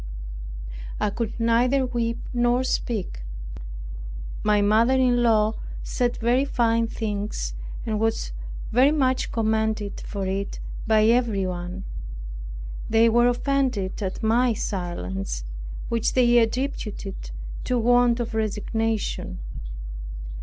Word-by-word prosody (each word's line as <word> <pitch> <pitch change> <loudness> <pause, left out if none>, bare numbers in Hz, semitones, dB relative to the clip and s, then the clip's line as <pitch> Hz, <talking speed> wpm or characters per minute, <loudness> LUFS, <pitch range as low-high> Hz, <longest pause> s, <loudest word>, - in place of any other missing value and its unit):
I 210 - +1
could 230 +2 -3
neither 245 +4 +3
weep 230 -2 -1 0.2
nor 240 +1 +3
speak. 215 - -1 1.2
My 210 -1 +4
mother 220 +5 +4
in 250 -2 +4
law 220 -2 +4 0.3
said 245 -2 0
very 240 +3 +3
fine 230 -4 +2
things, 205 - -2 0.3
and 215 -2 0
was 225 - 0 0.4
very 255 +5 +6
much 260 -4 +2
commended 220 -2 0
for 200 -2 -3
it 195 +1 -2 0.3
by 215 -1 +5
everyone. 195 -6 +1 1.1
They 225 +1 +6
were 240 +1 +5
offended 245 -6 +1
at 190 +2 -3
my 235 +2 +4
silence, 95 - -3 0.4
which 230 -2 +1
they 240 -1 +6
attributed 225 - -2 0.4
to 250 - +1
want 245 0 +4
of 235 -1 -2
resignation. 220 - -1
225 Hz, 105 wpm, -25 LUFS, 205-245 Hz, 1.2 s, very